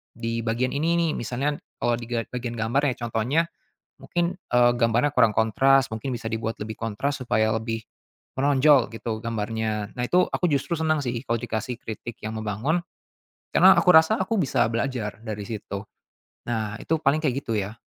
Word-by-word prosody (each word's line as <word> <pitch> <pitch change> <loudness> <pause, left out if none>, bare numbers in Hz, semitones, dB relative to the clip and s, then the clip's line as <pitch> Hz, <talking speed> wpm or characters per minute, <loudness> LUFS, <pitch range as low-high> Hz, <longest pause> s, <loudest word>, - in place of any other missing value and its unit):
di 115 0 -3
bagian 115 +3 -1
ini 160 +4 +1
nih," 165 -2 +2
misalnya 130 +5 -2 0.2
kalau 120 0 +2
di 115 - -8
ga 115 -1 -1
bagian 120 -1 -4
gambar 120 +6 0
ya 125 - 0
contohnya 120 +8 +1 0.6
mungkin, 175 0 -1 0.2
eee, 120 0 +5
gambarnya 120 +4 +2
kurang 115 -4 +5
kontras 135 +5 +4
mungkin 120 +4 -3
bisa 110 -1 -5
dibuat 110 0 -2
lebih 110 +1 -5
kontras 125 +6 -2
supaya 110 -2 +2
lebih 115 0 -4 0.6
menonjol 140 -2 +5
gitu 115 -1 -4
gambarnya. 110 -2 -3
Nah, 125 - -2
itu 180 +1 +4
aku 180 - 0
justru 140 +4 -1
senang 155 -1 +1
sih 120 - -1 0.2
kalau 115 - +2
dikasih 115 0 -3
kritik 115 +1 -7
yang 110 - -3
membangun 110 - -1 0.8
karena - - +8
aku 180 - +5
rasa 160 +7 +6
aku 220 +3 0
bisa 145 -8 +2
belajar 115 -3 -2
dari 105 -2 -5
situ. 100 -2 -5 0.7
Nah, 110 -2 -2
itu 160 - 0
paling 140 0 +3
kayak 135 -5 0
gitu 115 - -3
ya. 100 +2 -3
120 Hz, 175 wpm, -25 LUFS, 110-140 Hz, 0.8 s, karena